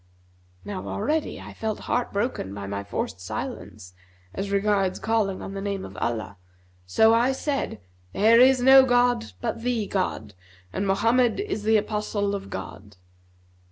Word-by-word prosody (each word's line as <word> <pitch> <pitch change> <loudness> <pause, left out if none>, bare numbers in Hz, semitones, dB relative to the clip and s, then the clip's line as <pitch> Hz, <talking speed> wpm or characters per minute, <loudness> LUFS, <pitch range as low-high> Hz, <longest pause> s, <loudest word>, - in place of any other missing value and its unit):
Now 200 -2 -5
already 300 +9 -2
I - - -10
felt 220 -1 -4
heart 245 - -1
broken 200 - -2
by 100 -1 -6
my 100 0 -4
forced 100 -2 -4
silence 90 0 -6 0.4
as 200 - -4
regards 200 -2 +1
calling 220 -4 -1
on 195 - -6
the 195 - -5
name 200 -1 -3
of 95 - -11
Allah; 110 -2 -3 0.5
so 220 - +5
I 240 +3 +3
said, 275 - -3 0.3
'There 225 +3 +5
is 255 0 +6
no 265 +1 +9
god 245 -2 +2
but 230 -1 -3
the 240 -3 -1
God, 145 - -3 0.4
and 195 - -1
Mohammed 230 +4 +2
is 400 - -3
the 220 +1 +3
Apostle 210 -1 -1
of 200 -1 -5
God. 95 +2 -8
205 Hz, 155 wpm, -25 LUFS, 185-235 Hz, 0.5 s, no